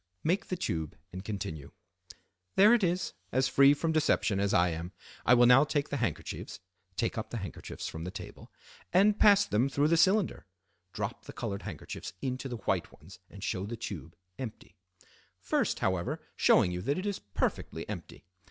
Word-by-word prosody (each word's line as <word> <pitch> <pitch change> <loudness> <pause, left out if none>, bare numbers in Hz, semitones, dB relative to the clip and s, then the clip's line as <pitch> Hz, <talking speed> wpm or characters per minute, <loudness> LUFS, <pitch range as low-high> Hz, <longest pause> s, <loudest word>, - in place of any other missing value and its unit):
Make 180 +5 +1
the 185 - -2
tube 80 - -3 0.2
and 95 +1 -6
continue—"There 95 - -1
it 235 -4 +3
is, 180 0 0 0.2
as 130 +2 +2
free 140 +2 +6
from 160 +2 -1
deception 145 -9 +2
as 100 0 +1
I 90 0 +4
am. 85 +3 -5 0.3
I 125 - +8
will 120 0 +6
now 125 +3 +7
take 145 -1 -1
the 145 - -2
handkerchiefs" 115 - -4 0.4
(take - - -1
up - - -5
the - - -4
handkerchiefs - - -6
from 80 - -6
the 90 - -4
table) - - -9 0.4
"and 200 +3 +4
pass 205 -1 +6
them 120 +6 +1
through 145 +2 +2
the 165 - +4
cylinder" 190 - +2 0.4
(drop - - -4
the - - -9
colored 100 0 -4
handkerchiefs 95 -8 -7
into 130 0 -3
the 120 - -4
white - - -1
ones 85 +6 -15
and 100 - -11
show 95 0 -2
the 115 +2 -5
tube 85 - -7 0.2
empty), 120 -5 -7 0.6
"first, - - 0
however, 95 -2 0 0.2
showing 90 - +4
you 90 0 -3
that 140 +9 0
it 185 - -3
is 205 -2 -2
perfectly 100 -2 -3
empty. - - -8
120 Hz, 180 wpm, -30 LUFS, -, 0.6 s, I